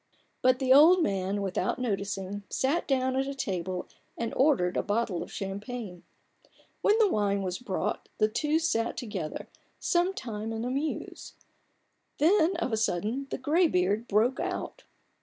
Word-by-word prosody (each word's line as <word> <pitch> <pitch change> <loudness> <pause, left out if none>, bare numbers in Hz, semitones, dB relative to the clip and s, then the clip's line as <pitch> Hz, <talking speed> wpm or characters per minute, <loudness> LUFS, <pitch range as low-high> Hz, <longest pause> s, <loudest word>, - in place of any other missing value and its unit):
But 255 0 +4
the 260 -1 +4
old 330 +6 +7
man, 195 -1 -1
without 190 -1 -1
noticing, 200 -4 -3
sat 285 +6 0
down 260 -1 +1
at 270 +1 0
a 275 - -4
table 185 -7 -3 0.3
and 230 -1 -3
ordered 255 -11 +2
a - - +2
bottle 205 -4 -1
of - - -7
champagne. 200 -1 -6 0.8
When 420 - +4
the 445 -2 +5
wine 200 - 0
was 185 -1 -3
brought, 210 -3 -3
the 215 - +4
two 300 +8 0
sat 235 -9 0
together 205 -10 -5 0.3
some 360 +2 +1
time 220 -1 -5
in 225 +1 -3
a 250 - -2
muse. 285 +4 -4 0.8
Then, 350 +2 +4
of 335 -7 -2
a - - +2
sudden, 220 +6 -1
the - - -3
graybeard 240 - +2
broke 225 +6 +2
out. - - -4
230 Hz, 155 wpm, -28 LUFS, 200-275 Hz, 0.8 s, old